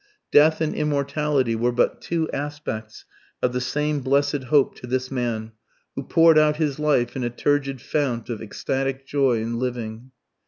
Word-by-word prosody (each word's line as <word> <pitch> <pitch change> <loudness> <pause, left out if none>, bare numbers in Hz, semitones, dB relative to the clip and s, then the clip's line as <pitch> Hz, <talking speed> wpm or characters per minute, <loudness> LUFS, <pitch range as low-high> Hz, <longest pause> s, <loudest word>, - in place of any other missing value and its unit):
Death 155 +2 +5
and 155 - 0
immortality 145 -4 0
were 120 +2 +1
but 120 - +1
two 165 -1 -1
aspects 140 -7 -5 0.3
of 125 - 0
the 125 - -1
same 150 +3 -1
blessed 140 +1 +1
hope 140 +2 +3
to 125 - -9
this 130 +1 -2
man, 115 -4 -2 0.4
who - - -3
poured 165 +2 +5
out 150 -1 +3
his 150 -2 -1
life 140 -6 +1
in 130 - -2
a 120 - 0
turgid 135 +2 0
fount 125 -5 -2
of 115 -3 -5
ecstatic 135 +5 -3
joy 135 -4 +2
in 115 +1 -3
living 120 -1 -4
135 Hz, 165 wpm, -23 LUFS, 120-150 Hz, 0.4 s, Death